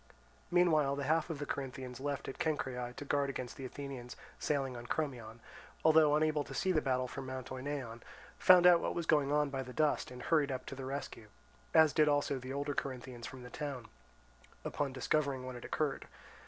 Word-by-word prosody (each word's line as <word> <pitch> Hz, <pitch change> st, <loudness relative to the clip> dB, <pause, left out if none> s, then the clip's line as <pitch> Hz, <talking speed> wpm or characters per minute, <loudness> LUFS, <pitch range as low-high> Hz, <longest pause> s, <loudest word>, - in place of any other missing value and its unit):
Meanwhile, 160 Hz, -6 st, +4 dB
the 140 Hz, -, -3 dB
half 160 Hz, +4 st, +1 dB
of 160 Hz, -, -3 dB
the 145 Hz, -, -4 dB
Corinthians 130 Hz, -2 st, -5 dB
left 140 Hz, 0 st, -3 dB
at 135 Hz, -, -6 dB
Cenchreae 130 Hz, -6 st, -1 dB
to 145 Hz, -, -7 dB
guard 140 Hz, 0 st, +1 dB
against 125 Hz, -2 st, -5 dB
the 135 Hz, -, -7 dB
Athenians 130 Hz, -2 st, -7 dB, 0.2 s
sailing 135 Hz, -4 st, 0 dB
on 120 Hz, 0 st, -8 dB
Crommyon, 120 Hz, -7 st, -3 dB, 0.4 s
although 155 Hz, -2 st, +6 dB
unable 155 Hz, -1 st, +2 dB
to 135 Hz, -, -8 dB
see 185 Hz, +9 st, +1 dB
the 155 Hz, -4 st, +3 dB
battle 130 Hz, -2 st, 0 dB
for 135 Hz, -, -6 dB
Mount 130 Hz, -1 st, -6 dB
Oneion, 130 Hz, -3 st, -4 dB, 0.4 s
found 180 Hz, -1 st, +7 dB
out 175 Hz, -1 st, +8 dB
what -, -, -2 dB
was 170 Hz, -, -2 dB
going 145 Hz, -3 st, +3 dB
on 150 Hz, -1 st, +2 dB
by 135 Hz, -1 st, -2 dB
the 125 Hz, -1 st, -8 dB
dust, 155 Hz, 0 st, +1 dB
and 125 Hz, -1 st, -9 dB
hurried 150 Hz, -4 st, +2 dB
up 130 Hz, -1 st, -4 dB
to -, -, -6 dB
the 135 Hz, 0 st, -6 dB
rescue; 135 Hz, -5 st, -5 dB, 0.5 s
as 160 Hz, -2 st, +7 dB
did 155 Hz, -1 st, +4 dB
also 145 Hz, -2 st, +1 dB
the 130 Hz, +1 st, -7 dB
older 140 Hz, +1 st, -2 dB
Corinthians 125 Hz, -3 st, -5 dB
from 130 Hz, -1 st, -9 dB
the 125 Hz, -, -10 dB
town, 140 Hz, -6 st, -5 dB, 0.8 s
upon 145 Hz, -2 st, -1 dB
discovering 135 Hz, 0 st, 0 dB
what 130 Hz, -, -5 dB
had 120 Hz, -, -8 dB
occurred. 150 Hz, -3 st, -2 dB
140 Hz, 200 wpm, -34 LUFS, 130-150 Hz, 0.8 s, out